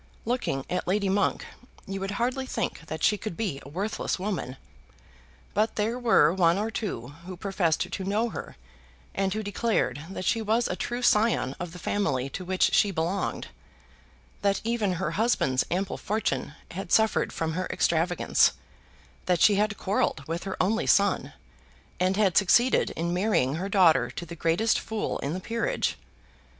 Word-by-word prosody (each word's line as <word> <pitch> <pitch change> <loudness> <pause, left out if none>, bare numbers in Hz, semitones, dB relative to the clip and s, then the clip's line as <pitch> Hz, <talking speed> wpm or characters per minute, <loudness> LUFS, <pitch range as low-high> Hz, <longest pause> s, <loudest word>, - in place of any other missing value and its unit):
Looking 230 - -1
at 180 0 -2
Lady 200 +1 +1
Monk 200 +1 +1 0.4
you 195 0 -4
would 195 0 -3
hardly 255 +2 -1
think 165 - -3
that 155 -1 -5
she 210 -2 +3
could 215 -7 -5
be 190 -12 -2
a 140 - -11
worthless 195 +8 -2
woman; 180 -9 -3 1.0
but 215 +3 +1
there 225 +4 -1
were 225 -10 +4
one 175 -1 +3
or 215 +2 -1
two 180 - -4 0.2
who 185 -1 -7
professed 185 -4 0
to 195 - -3
know 210 +5 0
her, - - -7 0.6
and 195 -1 0
who 215 +2 -2
declared 200 - -1
that 185 -1 -5
she 225 - +1
was 220 +2 +1
a - - -2
true 240 +5 -3
scion 210 - +3
of 175 -1 -5
the 180 - -10
family 140 -9 -1
to 185 - -5
which 185 +1 +1
she 205 - +4
belonged; 180 +2 -2 0.9
that 200 -1 +2
even 225 -4 0
her 165 -2 -2
husband's 165 - +1
ample 190 +2 -1
fortune 150 - -2 0.2
had 185 +1 -6
suffered 220 0 +3
from 160 -1 -2
her 185 +2 -2
extravagance, 170 +2 +2 0.7
that 180 -2 +2
she 210 - +6
had 210 0 +1
quarrelled 190 -7 0
with 165 +3 -4
her 195 - -4
only 220 +5 +1
son, 200 -1 +3 0.7
and 185 +2 +1
had 200 -5 +3
succeeded 240 +6 +4
in 170 +2 -1
marrying 180 -9 +1
her 190 +3 -3
daughter 185 -5 +4
to 175 - -7
the 170 +1 -8
greatest 170 +8 +2
fool 220 -1 -3
in 140 - -3
the 185 - -3
peerage. 230 +4 -1
195 Hz, 170 wpm, -27 LUFS, 170-215 Hz, 1.0 s, she